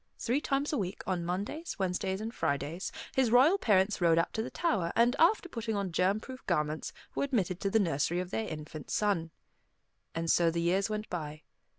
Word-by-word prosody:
Three 255 +5 0
times 280 +1 0
a 290 - +1
week, 190 -1 -4
on 180 -2 -1
Mondays, 200 - -3
Wednesdays, 190 +1 -1
and 225 +2 -4
Fridays, 150 - -2 0.2
his 260 -3 +3
royal 275 - +5
parents 200 - +2
rode 165 -1 +4
out 165 - +1
to 220 - -1
the - - -4
tower, 205 - 0
and 240 +3 +4
after 355 +2 +4
putting 230 -8 -3
on 200 -3 -2
germ 185 +5 +2
proof 260 +3 -10
garments, 155 -3 0 0.2
were - - -1
admitted 195 -10 0
to 195 - 0
the 220 - +3
nursery 170 -2 +1
of 180 0 -4
their 220 +1 -2
infant 155 -1 -7
son. 195 -6 +1 0.9
And 165 0 -2
so 170 -1 +4
the 170 +1 -1
years 185 +5 +1
went 215 0 -3
by. 155 -3 -5
190 Hz, 200 wpm, -31 LUFS, 170-230 Hz, 0.9 s, royal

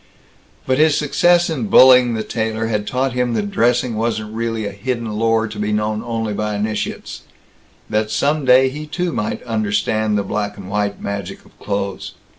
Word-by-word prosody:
But 130 +1 +1
his 155 -1 +4
success 175 +4 +3
in 135 -10 -2
bullying 125 0 +6
the 110 - -2
tailor 110 0 -2
had 105 -2 -2
taught 130 0 -1
him 125 -1 0
that 205 - -2
dressing 120 - +1
wasn't 110 -1 -2
really 115 -1 -2
a 100 - -3
hidden 115 +2 -4
lore 115 +1 +1
to 105 -1 -8
be 105 0 -1
known 105 0 -1
only 115 -2 -3
by 105 +1 -2
initiates; 105 +1 -4 0.7
that 105 0 -1
some 145 +5 0
day 130 +1 +5
he 150 +3 -7
too 175 +2 -2
might 105 - -3
understand 110 -1 0
the 100 - 0
black 105 0 -3
and 100 0 -9
white 105 0 -1
magic 100 -2 -6
of - - -22
clothes. 100 -1 -4
110 Hz, 180 wpm, -19 LUFS, 105-125 Hz, 0.7 s, bullying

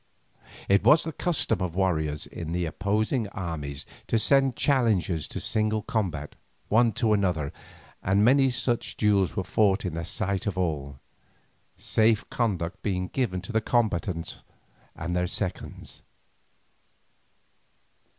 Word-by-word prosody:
It 100 +1 +4
was 150 - +6
the 160 - -3
custom 145 - 0
of 90 -2 -2
warriors 80 -6 0
in 80 -1 -6
the 90 0 0
opposing 105 - 0
armies 80 -8 -5 0.2
to 115 - +2
send 135 +2 +3
challenges 105 - +1
to - - -5
single 110 0 0
combat, 85 -10 -2 0.4
one 115 +2 +4
to 115 -2 +2
another, 90 -8 0 0.5
and 100 +3 +3
many 135 +2 +5
such 120 -1 -1
duels 100 -3 +2
were 95 - -1
fought 100 0 +2
in 90 - -2
the 85 +1 -3
sight 100 +3 -2
of 95 -3 -2
all, 75 -6 -2 0.8
safe 110 +2 +2
conduct 95 -7 -1
being 90 -3 -2
given 105 -9 -1
to 95 - -7
the 110 -1 +1
combatants 100 -7 -1 0.6
and 85 +2 -3
their 90 0 +1
seconds. 95 +1 -5
100 Hz, 130 wpm, -27 LUFS, 85-110 Hz, 0.8 s, was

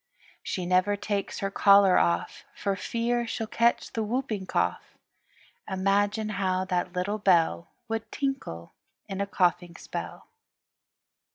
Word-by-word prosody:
She 185 - -3
never 185 +3 +2
takes 205 -1 -3
her 195 0 -1
collar 200 -2 +6
off 170 - 0
For 200 -1 -1
fear 235 +3 -1
she'll 225 0 -3
catch 235 +2 +1
the 225 - -1
whooping 220 -3 -2
cough. - - -2 0.7
Imagine 200 +3 +1
how 185 -2 0
that 180 -1 -1
little 195 +4 -2
bell 170 -3 +3 0.2
Would 225 0 -4
tinkle 270 - -4 0.3
in 195 0 -4
a 200 - -1
coughing 175 -2 +1
spell. - - -7
200 Hz, 125 wpm, -27 LUFS, 185-220 Hz, 0.7 s, collar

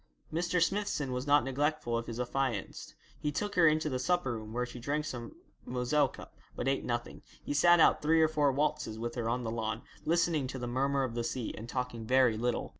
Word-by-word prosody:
Mr. 175 +2 +1
Smithson 175 -6 0
was 125 +2 -3
not 145 +1 +5
neglectful 145 -1 -1
of 115 0 -2
his 115 0 -5
affianced. 125 -4 -3 0.2
He 150 - -1
took 205 +7 -2
her 170 -2 +5
into 155 0 +2
the 130 -4 -1
supper 175 -3 +1
room, 110 -1 -7
where 125 +2 -1
she 125 0 -9
drank 150 +5 -1
some 125 - -6 0.3
Moselle 130 +4 +1
cup, - - -12 0.2
but - - -3
ate - - +1
nothing. - - -3 0.2
He - - -3
sat 175 +4 +6
out - - +5
three 160 +2 +3
or 160 - +6
four 150 -3 +2
waltzes 135 -5 -1
with 120 +1 -4
her 115 -2 -2
on 125 +1 -1
the 110 - -3
lawn, 110 0 -3 0.2
listening 165 -4 +1
to 130 - -5
the 125 - -4
murmer 135 +3 +1
of 125 -3 -3
the 120 0 -2
sea, 120 0 -3
and 115 +2 -8
talking 125 -3 -4
very 130 -2 +4
little. 120 +2 -1
130 Hz, 220 wpm, -31 LUFS, 120-155 Hz, 0.3 s, sat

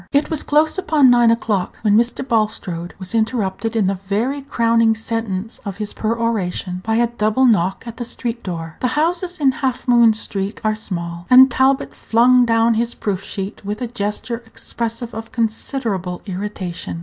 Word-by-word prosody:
It 285 +3 +1
was 315 - +1
close 310 +4 +2
upon 295 -8 +4
nine 240 -1 +5
o'clock 215 -5 0
when 210 -2 +4
Mr. 240 +3 +1
Bulstrode 185 -7 -1
was 185 +2 -5
interrupted 225 -1 -1
in 220 -3 +2
the 195 - +1 0.2
very 250 +8 0
crowning 230 -4 +2
sentence 225 -2 -4
of 200 -2 -6
his 210 -1 -5
peroration 215 -5 -2
by 220 +2 0
a 235 +1 +4
double 235 +2 +1
knock 195 -5 +2
at 235 -1 -8
the 245 - -3
street 235 0 -4
door. 165 -3 -6
The 255 +3 -1
houses 350 +3 0
in 275 -3 +4
Half 260 -1 -3
Moon 235 -2 +6
street 205 -1 -4
are 215 0 +2
small, 170 -5 -5
and 260 +1 +8
Talbot 265 +3 +2
flung 245 +2 +4
down 230 0 +3
his 235 +1 -1
proof 195 -3 -2
sheet 195 +1 -5
with 205 +2 -4
a 250 - -2
gesture 230 +1 -3
expressive 230 +1 -5
of 225 +1 -7
considerable 220 -5 -2
irritation. 185 -4 -5
225 Hz, 175 wpm, -19 LUFS, 200-245 Hz, 0.2 s, and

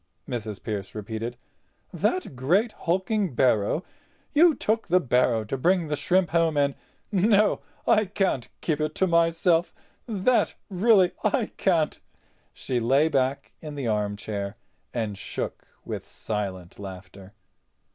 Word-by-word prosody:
Mrs. 110 -4 -5
Pearce 105 -3 -4
repeated. 110 +3 -5 0.6
"That 365 - -1
great 180 - +2
hulking 190 - -1
barrow—you 165 - +1
took 225 +1 0
the 180 +1 +4
barrow 125 -6 +2
to 110 - -3
bring 175 +1 +2
the 150 - +1
shrimps 180 +4 +1
home 165 -2 +2
in? 140 -1 +3 0.4
No—I 210 +1 +2
can't 190 - -1
keep 155 -2 0
it 155 0 -1
to 190 - +2
myself—that 175 +6 +1 0.2
really 190 -1 +4
I 220 +2 +1
can't—" 165 -5 +1 0.5
she 125 -2 -2
lay 135 +7 +3
back 135 -2 0
in 150 -2 -7
the 140 -3 -4
armchair 105 -1 -2 0.3
and 110 -4 -2
shook - - -5 0.2
with - - -5
silent 95 -5 -4
laughter. 95 0 -10
150 Hz, 120 wpm, -26 LUFS, 110-185 Hz, 0.6 s, the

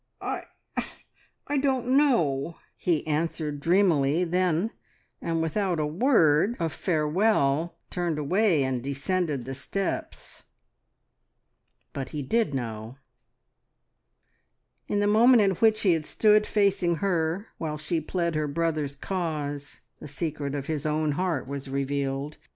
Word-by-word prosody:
"I 290 - -7
don't 265 -3 0
know!" 170 - +2 0.2
he 170 -4 0
answered 155 -1 -2
dreamily 165 -2 +3
then, 180 +3 +1 0.5
and 165 -1 -1
without 175 +1 0
a 150 - +1
word 175 - +3
of 165 -2 -1
farewell 160 -2 +1 0.2
turned 175 -3 -1
away 170 +1 +2
and 130 -2 -2
descended 140 0 -1
the 135 - -5
steps. 195 +8 -4 1.5
But 135 -2 -4
he 150 -2 -4
did 215 - +1
know. 115 0 -5 1.9
In 205 - 0
the - - +2
moment 225 +3 +6
in 195 - +3
which 215 +4 +3
he 185 -4 +4
had 160 -2 -1
stood 210 -1 +4
facing 195 -4 +2
her 175 +2 -1
while 155 -2 -3
she 155 +2 -2
pled 170 +1 -1
her 155 -1 0
brother's 150 -2 -1
cause, 145 -8 -4 0.2
the - - -9
secret 145 -1 -3
of 140 -1 -3
his 150 -2 -2
own 155 0 0
heart 160 -3 -1
was 140 0 -5
revealed. 140 +1 -2
160 Hz, 125 wpm, -27 LUFS, 145-190 Hz, 1.9 s, moment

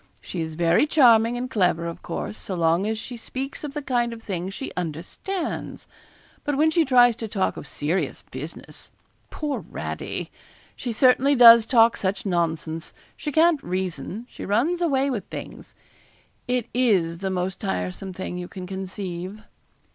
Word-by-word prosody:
She 175 - -5
is 160 -1 -4
very 170 - +3
charming 240 -5 +5
and 250 +1 -3
clever, 180 -7 +1
of 170 0 -6
course, 175 - -5
so 190 - -6
long 170 +3 +2
as 220 0 -1
she 245 +3 -7
speaks 265 +5 -6
of 290 -1 -6
the 295 - -3
kind 240 -3 0
of 225 -1 -11
thing 185 -2 -3
she 235 +7 -6
understands. 180 - -4 0.6
But 290 -2 -1
when 315 +2 +4
she 330 +1 +4
tries 245 -4 +5
to 225 - -4
talk 200 -3 -1
of - - -8
serious 160 +8 -2
business - - -8 0.4
poor 295 -2 -3
Radie! - - -5 0.4
she 245 - -4
certainly 255 +4 +4
does 230 -2 +9
talk 230 -2 +5
such 190 +1 -2
nonsense! 165 -3 -2 0.2
She 300 - -4
can't 320 0 +4
reason; 185 +4 -4
she - - -10
runs 280 - +1
away 275 -4 +2
with 215 -7 -3
things. - - -9 0.7
It 250 -2 0
is 190 -10 +2
the 190 0 -2
most 185 0 -2
tiresome 90 - -3
thing 180 -1 -5
you 180 - -5
can 185 -1 -8
conceive.' 190 +1 -6
215 Hz, 160 wpm, -24 LUFS, 180-255 Hz, 0.7 s, does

